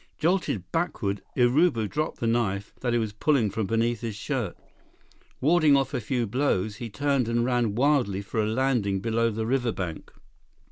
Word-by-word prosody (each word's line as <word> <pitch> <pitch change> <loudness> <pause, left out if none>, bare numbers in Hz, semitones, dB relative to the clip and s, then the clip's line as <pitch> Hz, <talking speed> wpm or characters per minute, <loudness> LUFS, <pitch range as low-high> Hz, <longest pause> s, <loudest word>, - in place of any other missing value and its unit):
Jolted 165 - 0
backward, 130 - -1 0.2
Urubu 125 -2 +3
dropped 155 +7 -3
the - - 0
knife 105 -4 0
that 125 - -1
he 120 - +2
was 110 -3 -2
pulling 115 -1 +2
from 110 -1 -2
beneath 115 +1 0
his 115 -3 -4
shirt. 110 - -3 0.8
Warding 155 0 +4
off 135 +1 -1
a 130 - -1
few 120 +2 -1
blows, 110 -4 0
he 120 -2 -6
turned 140 +2 0
and 120 0 +1
ran 120 -4 +1
wildly 125 -7 +2
for 110 +2 -2
a - - 0
landing 110 -5 +1
below 115 +2 +1
the 110 0 -3
riverbank. 115 -10 -2
120 Hz, 170 wpm, -26 LUFS, 105-135 Hz, 0.8 s, Warding